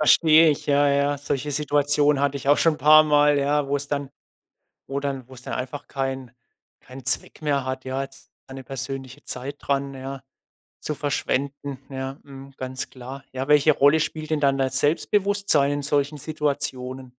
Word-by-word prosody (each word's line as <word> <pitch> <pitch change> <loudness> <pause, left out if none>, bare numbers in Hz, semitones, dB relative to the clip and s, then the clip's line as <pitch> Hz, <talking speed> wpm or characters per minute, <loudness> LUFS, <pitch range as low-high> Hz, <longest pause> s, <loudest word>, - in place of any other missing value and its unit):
Verstehe 160 +1 +6
ich, 145 - -3
ja, 145 0 +3
ja. 140 0 +1
Solche 145 0 -3
Situationen 145 0 +2
hatte 140 0 +1
ich 140 0 -5
auch 145 - +5
schon 165 -2 +3
'n - - -12
paar 155 +2 +8
Mal, 150 -1 +4
ja, 145 0 +1
wo 140 - -1
es 140 0 -6
dann 140 -1 -3 0.8
wo 140 +1 -3
dann 135 -3 -4
wo 130 - -12
es 125 - -13
dann - - -5
einfach 130 +3 -5
kein 135 -2 -3 0.5
keinen 130 0 -12
Zweck 130 - -2
mehr 140 -3 0
hat, 130 0 -4
ja, 130 +1 -2
jetzt 135 - -11 0.2
eine 135 0 -9
persönliche 135 +1 -6
Zeit 135 +3 -6
dran, 140 0 -1
ja, 135 0 -7 0.6
zu 150 - -3
verschwenden, 140 -1 -2
ja, 135 +1 -5
mhm, 135 -1 -12
ganz 130 0 -5
klar. 130 +2 -9
Ja, 130 +2 -4
welche 150 +1 +5
Rolle 145 +2 +4
spielt 155 0 -3
denn 155 -2 +1
dann 140 -1 +3
das 130 -1 0
Selbstbewusstsein 190 -2 +2
in 145 0 -2
solchen 145 +1 0
Situationen? 135 -4 -2
140 Hz, 180 wpm, -24 LUFS, 135-145 Hz, 0.8 s, paar